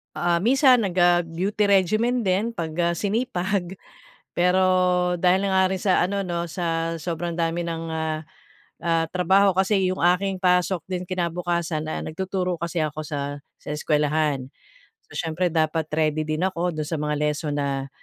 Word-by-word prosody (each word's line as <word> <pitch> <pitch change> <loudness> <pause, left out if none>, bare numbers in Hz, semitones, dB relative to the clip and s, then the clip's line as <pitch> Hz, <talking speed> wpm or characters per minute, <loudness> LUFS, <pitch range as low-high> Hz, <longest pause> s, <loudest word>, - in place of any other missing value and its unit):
ah, 175 -1 +1
minsan 255 - +5
nag, 180 - -3
ah, 175 -1 +4
beauty 195 +6 -1
regimen 215 +6 +2
din 205 +4 0
pag, 165 -5 -3
ah, 170 0 +2
sinipag. 195 -2 -1 0.6
Pero, 180 +2 +2 0.6
dahil 185 +2 +3
na 200 - 0
nga 190 0 +4
rin - - -5
sa 190 -3 +3
ano 200 0 -2
'no 170 -1 -3
sa 165 -1 -2
sobrang 170 +1 -4
dami 170 0 -1
ng, 165 0 -3
ah, 160 -1 -2 0.6
ah, 165 -1 +1
trabaho 190 +2 +4
kasi 190 0 +2
yung - - -5
aking 180 +2 +2
pasok 180 -1 +2
din 180 -1 -3
kinabukasan, 170 -3 -2
ah, 155 - -4
nagtuturo 180 +1 -3
kasi 170 0 -3
ako 155 0 -2
sa 145 -1 -5 0.2
sa - - -13
eskwelahan. 150 -3 0 0.6
So - - -12
siyempre 170 +2 -1
dapat 160 -1 +1
ready 155 0 +1
din 155 +1 -2
ako 180 -2 -1
do'n 155 -1 -3
sa 165 - -2
mga 150 0 -1
lesson 150 0 -1
na, 135 -1 -2
175 Hz, 165 wpm, -24 LUFS, 160-190 Hz, 0.6 s, minsan